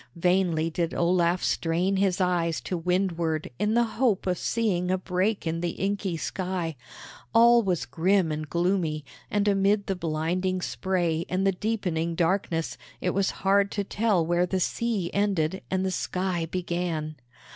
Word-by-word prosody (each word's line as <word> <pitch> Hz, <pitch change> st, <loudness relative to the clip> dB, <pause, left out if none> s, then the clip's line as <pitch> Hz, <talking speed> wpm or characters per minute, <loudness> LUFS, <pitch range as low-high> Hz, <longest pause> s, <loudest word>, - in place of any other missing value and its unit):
Vainly 170 Hz, -2 st, +1 dB
did 165 Hz, 0 st, -2 dB
Olaf 175 Hz, 0 st, +2 dB
strain 175 Hz, +4 st, +1 dB
his 190 Hz, -1 st, +1 dB
eyes 175 Hz, -3 st, +1 dB
to 185 Hz, -, -3 dB
windward 170 Hz, -2 st, -1 dB
in 210 Hz, +2 st, +1 dB
the 240 Hz, -, +5 dB
hope 230 Hz, -3 st, 0 dB
of 180 Hz, -2 st, 0 dB
seeing 190 Hz, -6 st, 0 dB
a 185 Hz, -, +2 dB
break 185 Hz, +3 st, -1 dB
in 165 Hz, 0 st, -1 dB
the 175 Hz, -1 st, -1 dB
inky 195 Hz, -3 st, -2 dB
sky. 180 Hz, 0 st, -3 dB, 0.6 s
All 235 Hz, +1 st, +7 dB
was 185 Hz, -6 st, -1 dB
grim 175 Hz, +4 st, +2 dB
and 155 Hz, 0 st, -4 dB
gloomy, 170 Hz, -4 st, 0 dB, 0.2 s
and 205 Hz, 0 st, +1 dB
amid 200 Hz, +1 st, +2 dB
the 195 Hz, -, -1 dB
blinding 175 Hz, +3 st, -1 dB
spray 170 Hz, +4 st, -1 dB
and 185 Hz, +1 st, 0 dB
the 195 Hz, -, +4 dB
deepening 180 Hz, -5 st, -2 dB
darkness 165 Hz, -1 st, 0 dB, 0.2 s
it 180 Hz, -, 0 dB
was 195 Hz, +1 st, +1 dB, 0.2 s
hard 200 Hz, +1 st, +4 dB
to 205 Hz, -, -1 dB
tell 200 Hz, -4 st, +1 dB
where 175 Hz, +2 st, +2 dB
the 185 Hz, +2 st, -1 dB
sea 205 Hz, -2 st, -1 dB
ended 190 Hz, -4 st, 0 dB
and 190 Hz, 0 st, 0 dB
the 190 Hz, -, 0 dB
sky 180 Hz, -2 st, -2 dB
began. 170 Hz, -3 st, -3 dB
180 Hz, 155 wpm, -26 LUFS, 165-195 Hz, 0.6 s, All